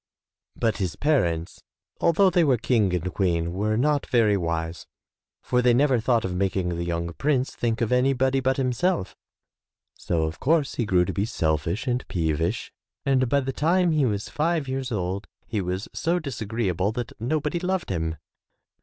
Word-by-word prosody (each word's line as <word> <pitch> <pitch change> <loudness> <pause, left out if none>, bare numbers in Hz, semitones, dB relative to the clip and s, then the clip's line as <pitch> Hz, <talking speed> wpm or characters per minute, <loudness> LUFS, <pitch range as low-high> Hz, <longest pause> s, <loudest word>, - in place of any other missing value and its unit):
But 115 -2 0
his 95 -4 -2
parents, 85 - 0 0.4
although 185 +3 +4
they 175 0 +4
were 135 -5 +3
King 110 -4 +2
and 90 +1 -3
Queen, 85 -3 0
were 105 +3 0
not 145 +3 +1
very 115 -5 +3
wise, 85 -2 -3 0.6
for 125 0 +1
they 125 -1 +4
never 135 -1 +3
thought 115 0 +1
of 95 - -2
making 95 -1 0
the 85 0 -2
young 85 0 -2
prince 135 - 0
think 115 -1 -1
of 115 - 0
anybody 130 +1 +2
but 130 0 +1
himself, 135 - 0 0.8
so, 80 -2 -1
of 80 +1 -3
course, 150 0 +2
he 120 - -2
grew 90 -2 +3
to 95 - -3
be 100 +5 0
selfish 80 - -1
and 125 -1 -1
peevish, 80 -1 -1 0.3
and 130 -2 +2
by 140 +2 +3
the 135 0 -3
time 175 +4 +2
he 150 -4 +2
was 100 -2 -2
five 160 -1 0
years 130 0 -3
old 95 -1 -2 0.2
he 110 -3 -2
was 90 +2 -3
so 170 +2 0
disagreeable 110 - -2
that 120 0 -4
nobody 150 +6 -1
loved 185 - -2
him. 80 -2 -2
115 Hz, 170 wpm, -25 LUFS, 90-135 Hz, 0.8 s, although